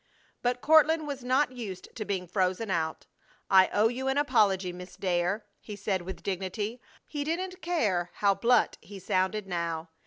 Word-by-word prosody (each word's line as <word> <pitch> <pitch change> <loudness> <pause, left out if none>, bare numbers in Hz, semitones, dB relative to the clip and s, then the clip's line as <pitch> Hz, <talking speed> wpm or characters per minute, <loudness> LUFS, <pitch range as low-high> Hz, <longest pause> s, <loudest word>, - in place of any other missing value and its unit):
But 245 0 0
Courtland 315 0 +5
was 280 -3 -5
not 260 +2 +2
used 210 -8 -8
to 215 - -4
being 190 -3 -2
frozen 185 +3 0
out. 160 -2 -1 0.5
"I 190 -1 +7
owe 210 +2 +4
you 255 +3 -3
an 270 +1 +1
apology, 200 -10 +2
Miss 180 +1 -10
Dare," 180 +3 0
he 210 - -8
said, 195 -2 -1
with 185 +1 -8
dignity. 200 +5 -3 0.2
He 290 -2 -4
didn't 365 +4 -3
care 210 - 0
how 200 -1 +3
blunt 240 +3 +2
he 200 - -11
sounded 190 +2 0
now. 170 -3 -3
205 Hz, 165 wpm, -29 LUFS, 185-255 Hz, 0.5 s, I